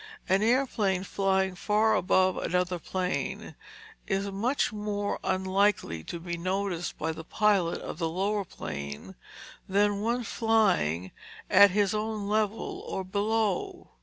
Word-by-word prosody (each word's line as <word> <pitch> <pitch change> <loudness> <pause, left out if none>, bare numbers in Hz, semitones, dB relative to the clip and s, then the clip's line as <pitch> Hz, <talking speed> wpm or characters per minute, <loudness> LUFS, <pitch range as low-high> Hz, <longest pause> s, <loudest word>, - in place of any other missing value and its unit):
An 190 +2 +3
airplane 220 -6 +1
flying 190 -1 +1
far 210 +3 +2
above 185 +1 +3
another 180 0 -1
plane 185 +2 -3 0.5
is 195 0 -1
much 235 +6 0
more 205 -1 -2
unlikely 190 - +1
to 170 - -5
be 175 0 -4
noticed 185 -1 -2
by 160 +1 -1
the 160 0 -7
pilot 195 -2 +1
of - - -7
the 165 -2 0
lower 200 +4 0
plane 70 - -7 0.6
than 205 +1 +2
one 240 +3 0
flying 195 - +1 0.4
at 200 +1 +8
his 200 +1 +1
own 215 -1 -2
level 215 +1 -1
or 190 - -3
below 220 - -1
him. - - -35
195 Hz, 135 wpm, -28 LUFS, 180-210 Hz, 0.6 s, at